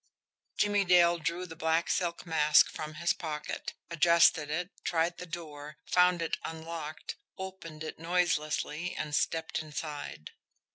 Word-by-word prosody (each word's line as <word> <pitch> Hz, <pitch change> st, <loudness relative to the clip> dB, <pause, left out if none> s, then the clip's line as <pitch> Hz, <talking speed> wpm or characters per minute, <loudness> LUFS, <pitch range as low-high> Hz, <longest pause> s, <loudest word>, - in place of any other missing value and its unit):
Jimmie 205 Hz, -1 st, +3 dB
Dale 175 Hz, -2 st, +5 dB
drew 170 Hz, +3 st, -2 dB
the 165 Hz, -2 st, -9 dB
black 160 Hz, +1 st, +1 dB
silk 175 Hz, -2 st, -1 dB
mask 155 Hz, -2 st, +5 dB
from 155 Hz, 0 st, -6 dB
his 170 Hz, +2 st, +1 dB
pocket, 150 Hz, -3 st, -5 dB, 0.2 s
adjusted 170 Hz, -2 st, +5 dB
it, 175 Hz, +5 st, -2 dB
tried 170 Hz, +1 st, 0 dB
the 180 Hz, -, -7 dB
door, 150 Hz, -3 st, -7 dB
found 180 Hz, -1 st, +4 dB
it 165 Hz, -, -2 dB
unlocked, 160 Hz, -1 st, -6 dB, 0.2 s
opened 185 Hz, -5 st, -7 dB
it 155 Hz, -, -6 dB
noiselessly, 165 Hz, -1 st, 0 dB
and 150 Hz, -, -4 dB
stepped 160 Hz, +2 st, 0 dB
inside. 150 Hz, -, -6 dB
165 Hz, 135 wpm, -31 LUFS, 155-175 Hz, 0.2 s, Dale